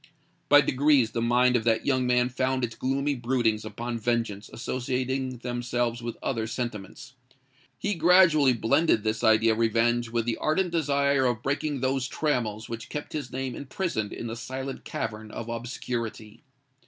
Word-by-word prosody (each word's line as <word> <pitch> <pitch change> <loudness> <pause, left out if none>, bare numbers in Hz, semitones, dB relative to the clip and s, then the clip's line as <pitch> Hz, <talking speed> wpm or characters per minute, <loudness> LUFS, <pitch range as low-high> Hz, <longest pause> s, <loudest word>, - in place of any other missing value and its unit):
By 145 0 +8
degrees 140 -3 +3
the 115 - -2
mind 125 +2 +3
of 115 - +1
that 115 -1 +2
young 130 -2 +1
man 125 0 +3
found 130 0 -1
its 115 -2 -2
gloomy 140 +4 -1
broodings 120 -4 0
upon 120 +2 -5
vengeance 115 -3 -1
associating 130 +1 -2
themselves 120 -1 -2
with 120 0 -5
other 115 -4 -1
sentiments. 120 0 -6 0.6
He 205 - -1
gradually 165 -5 +5
blended 120 +1 +2
this 110 0 -1
idea 110 0 +5
of 110 - -1
revenge 115 +1 +2
with 115 -1 -1
the 120 - -1
ardent 175 +3 0
desire 140 -4 +2
of 120 -2 -2
breaking 140 0 -1
those 130 0 0
trammels 115 -9 -1
which 115 0 -7
kept 150 - -6
his 150 -2 -4
name 130 0 -3
imprisoned 135 - -3
in - - -6
the 115 0 -4
silent 130 +2 -6
cavern 110 0 -4
of 115 +2 -7
obscurity. 115 -2 -5
125 Hz, 160 wpm, -27 LUFS, 115-135 Hz, 0.6 s, By